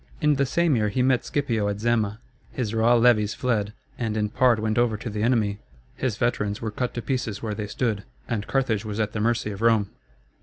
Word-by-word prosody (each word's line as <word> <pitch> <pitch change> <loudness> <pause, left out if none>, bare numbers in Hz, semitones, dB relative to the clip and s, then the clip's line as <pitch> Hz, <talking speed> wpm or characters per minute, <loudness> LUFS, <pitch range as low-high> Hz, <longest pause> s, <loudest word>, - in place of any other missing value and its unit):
In 150 0 +3
the 140 0 +2
same 170 +1 +2
year 105 -2 +1
he 125 +5 0
met 130 -1 +2
Scipio 115 -8 0
at 100 0 -2
Zama; 110 -2 0 0.3
his 115 -5 -3
raw 115 +2 +4
levies 115 -3 +4
fled, 110 -5 0 0.3
and 110 -3 -1
in 105 -1 0
part 120 0 +3
went 110 +1 0
over 120 -3 +2
to 115 +1 -6
the 105 0 -3
enemy; 110 -4 +1 0.4
his 125 -5 -2
veterans 105 -4 0
were 110 -2 -3
cut 125 +3 -3
to 120 - -3
pieces 120 -6 -2
where 110 -2 -2
they 105 0 -4
stood, 105 -1 -1 0.2
and 105 -4 -2
Carthage 120 -6 0
was 105 -1 -5
at 105 -1 0
the 105 - -4
mercy 115 -1 0
of 100 +1 -7
Rome. 115 -3 +3
110 Hz, 220 wpm, -25 LUFS, 105-120 Hz, 0.4 s, raw